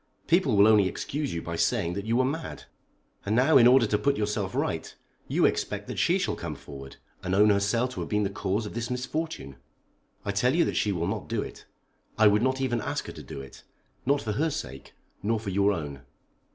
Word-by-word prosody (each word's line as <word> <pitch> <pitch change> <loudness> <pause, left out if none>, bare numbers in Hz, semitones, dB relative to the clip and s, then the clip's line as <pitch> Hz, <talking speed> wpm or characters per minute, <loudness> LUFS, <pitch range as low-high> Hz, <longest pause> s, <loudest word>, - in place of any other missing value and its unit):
People 160 - +3
will 100 +1 +7
only 105 -3 +5
excuse 145 +8 -3
you 85 - -4
by 85 - -4
saying 85 +1 +1
that 100 +3 -5
you 115 - +1
were 130 +1 +3
mad. 160 +5 -4 0.6
And 105 +2 0
now 135 +5 +5
in 120 -2 +7
order 125 -1 +6
to 105 -1 0
put 140 0 +1
yourself 105 -2 -2
right, - - -2 0.3
you - - +2
expect - - -1
that - - -4
she - - +3
shall - - -1
come - - -5
forward, 70 -1 -10 0.3
and 95 +1 -1
own 105 +1 +6
herself 105 +5 +1
to - - -6
have - - -4
been 105 -1 +1
the 100 - -1
cause 100 +3 -1
of 105 - -7
this 115 0 -3
misfortune. 125 - -4 0.7
I 100 - 0
tell 125 +8 +2
you 170 -1 +4
that - - -2
she 105 - +1
will 85 -3 -1
not 100 +2 -3
do - - -1
it. - - -10 0.5
I 110 - +5
would 105 0 +5
not 130 +1 +1
even 120 -3 0
ask - - -3
her - - -7
to - - -9
do 70 - -8
it; 65 - -13 0.4
not 140 +2 +1
for 110 - -2
her 155 +10 +1
sake, 65 - -7 0.3
nor 110 +2 0
for 105 -3 -5
your 100 +2 +3
own." 75 -7 -5
105 Hz, 230 wpm, -27 LUFS, 100-125 Hz, 0.7 s, will